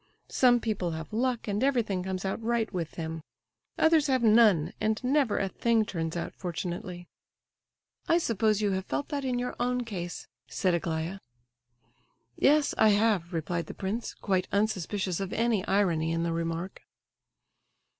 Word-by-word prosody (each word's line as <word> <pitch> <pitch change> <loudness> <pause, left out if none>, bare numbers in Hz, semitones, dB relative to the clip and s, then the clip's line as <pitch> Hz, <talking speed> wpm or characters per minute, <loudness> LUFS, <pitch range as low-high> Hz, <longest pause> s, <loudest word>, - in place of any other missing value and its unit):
Some 245 -2 +4
people 210 -6 -2
have 160 +4 -7
luck, 245 +1 0
and 205 +3 -1
everything 235 -9 +1
comes 185 0 -4
out 190 +4 -2
right 225 -1 -1
with 170 -4 -3
them; 160 -1 -5 0.6
others 320 -2 +4
have 260 -3 +1
none, 215 -8 +5
and 215 0 +1
never 265 -3 +2
a 195 - 0
thing 225 +2 +1
turns 165 -3 -3
out 170 - -4
fortunately." 175 0 -5 1.0
"I 335 - +4
suppose 215 - +1
you 205 - +2
have 190 0 -2
felt 285 - -2
that 285 -2 -2
in 255 -2 -1
your 250 0 -3
own 250 0 0
case," 180 -6 -6 0.2
said 185 -3 0
Aglaya. 170 +2 -2 1.2
"Yes, 290 - +3
I 220 - +6
have," 205 -4 +2
replied 170 0 -2
the - - -8
prince, 210 +4 -4
quite 190 -2 -1
unsuspicious 200 -3 -1
of 195 -2 -4
any 225 -4 +1
irony 170 -5 +2
in 165 0 0
the 170 -1 -1
remark. 165 +2 -3
200 Hz, 155 wpm, -28 LUFS, 175-235 Hz, 1.2 s, I